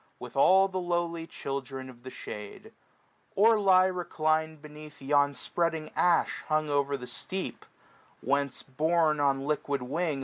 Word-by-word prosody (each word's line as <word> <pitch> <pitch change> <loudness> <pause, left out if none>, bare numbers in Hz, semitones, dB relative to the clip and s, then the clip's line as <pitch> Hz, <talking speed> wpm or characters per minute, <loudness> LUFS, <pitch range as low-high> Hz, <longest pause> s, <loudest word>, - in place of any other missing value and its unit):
With - - -10
all 190 +1 +6
the 190 -1 -3
lowly 170 -2 -2
children 135 -2 -5
of 125 -2 -13
the 130 - -8
shade: 105 -4 -9 0.6
Or 220 +2 +5
lie 185 -2 +5
reclin'd 160 -3 -1
beneath 150 0 -12
yon 145 +1 +2
spreading 160 +3 -2
ash, 175 -2 +2
Hung 155 -1 0
o'er 140 0 +1
the 125 - -8
steep; 185 +9 -5 0.5
whence, 140 +1 -1
borne 155 +2 +1
on 135 -1 +1
liquid 145 -2 -1
wing. 150 +2 -2
155 Hz, 140 wpm, -29 LUFS, 140-170 Hz, 0.6 s, all